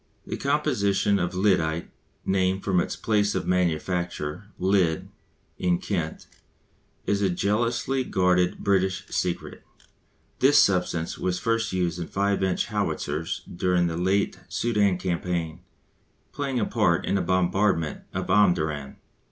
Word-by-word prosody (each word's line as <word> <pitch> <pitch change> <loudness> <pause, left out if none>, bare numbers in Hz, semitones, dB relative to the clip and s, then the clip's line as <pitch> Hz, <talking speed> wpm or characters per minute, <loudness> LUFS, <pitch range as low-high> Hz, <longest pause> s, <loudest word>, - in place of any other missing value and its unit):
The - - -4
composition 120 -9 +1
of 90 +1 -2
lyddite 85 -4 +1 0.3
(named 95 0 +1
from 95 -3 +2
its - - -1
place 105 -1 +1
of - - -1
manufacture, 90 -1 -1
Lydd, 90 -4 +1 0.5
in 90 -1 +2
Kent) 85 -5 -3 0.8
is 100 0 +1
a 100 - +2
jealously 115 +8 0
guarded 90 -4 +2
British 95 -2 0
secret. 90 -1 -3 0.8
This 135 +3 +5
substance 90 -3 +2
was 90 -1 -1
first 115 +1 0
used 90 -2 -1
in 85 - -4
5 100 0 0
inch 95 -1 +1
howitzers 75 +3 -2
during 90 0 +1
the 85 -1 -1
late 95 +4 0
Soudan 105 -5 +1
campaign, 85 -2 -2 0.7
playing 135 -3 -2
a 105 - +1
part 95 -7 +1
in - - -1
the 100 - +2
bombardment 95 -3 +1
of 95 0 -3
Omdurman. 80 -8 +2
95 Hz, 125 wpm, -25 LUFS, 85-100 Hz, 0.8 s, This